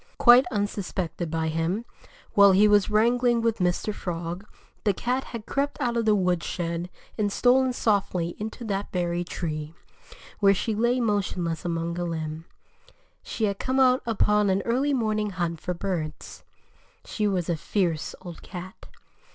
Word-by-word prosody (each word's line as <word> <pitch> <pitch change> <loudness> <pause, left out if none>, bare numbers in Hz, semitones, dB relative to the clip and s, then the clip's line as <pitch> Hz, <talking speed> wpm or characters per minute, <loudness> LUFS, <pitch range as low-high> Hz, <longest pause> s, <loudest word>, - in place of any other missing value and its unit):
Quite 245 +1 +7
unsuspected 190 -5 -3
by 160 0 -1
him, 165 +8 -1 0.5
while 200 -1 +7
he 205 +3 +6
was 205 -1 +4
wrangling 240 +3 +3
with 230 -2 +1
Mr. 180 +4 0
Frog, 175 +2 -5 0.4
the 205 -3 +2
cat 250 +5 -1
had 230 -3 -7
crept 280 +2 -2
out 240 -4 0
of 230 -1 0
the 215 -1 +4
woodshed 175 -2 -1 0.3
and 205 -1 +1
stolen 255 +4 +3
softly 195 -7 0
into 220 +3 -6
that 200 -2 -3
very 175 -1 -1
tree, 155 -2 -5 0.6
where 200 -1 +5
she 220 +3 -1
lay 240 +4 +1
motionless 190 -7 -1
along 170 0 -2
a - - -1
limb. 160 -1 -4 0.8
She 225 - -5
had 200 -1 -2
come 260 +1 0
out 255 -1 +5
upon 210 -2 +2
an 190 +1 +1
early 260 +5 +1
morning 215 -3 0
hunt 175 -4 -3
for 180 - -3
birds. 170 -4 -5 0.6
She 210 -1 -1
was 185 -4 -1
a 170 - +1
fierce 165 -1 -1
old 175 -2 -9
cat. 185 +2 -9
200 Hz, 155 wpm, -26 LUFS, 175-225 Hz, 0.8 s, Quite